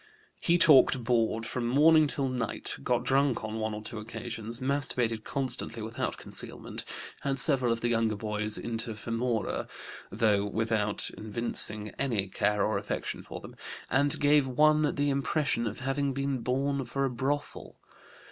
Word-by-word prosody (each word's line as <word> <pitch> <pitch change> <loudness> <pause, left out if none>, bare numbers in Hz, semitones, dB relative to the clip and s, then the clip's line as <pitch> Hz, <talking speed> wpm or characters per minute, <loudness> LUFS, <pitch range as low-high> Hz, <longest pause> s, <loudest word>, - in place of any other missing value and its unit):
He 170 0 +3
talked 130 -6 +6
bawd 115 -1 +1
from 120 +1 -3
morning 155 +4 +5
till 140 -1 0
night, 125 -4 -3
got 120 - 0
drunk 135 -1 +2
on 110 +1 -4
one 110 -1 -2
or 105 - -7
two 115 0 -5
occasions, 115 +1 -5
masturbated 125 -5 0
constantly 125 -4 -2
without 110 +2 -3
concealment, - - -5 0.4
had 135 -1 -2
several 130 -3 +4
of 115 0 -1
the 120 - 0
younger 115 -2 +1
boys 105 0 -2
inter 115 0 -4
femora, 115 +1 -2 0.4
though 105 -1 +2
without 105 0 0
evincing 105 -1 0
any 110 -8 0
care 105 +1 +1
or 110 - 0
affection - - -4
for - - -9
them, - - -11 0.4
and 140 +3 +3
gave 145 -1 +4
one 150 +3 +3
the 145 -1 +1
impression 140 -3 0
of 110 +4 -6
having 135 +1 -1
been 140 0 -1
born 135 +3 -1
for 135 +3 -2
a - - 0
brothel. 140 +4 -3
120 Hz, 155 wpm, -29 LUFS, 110-140 Hz, 0.4 s, talked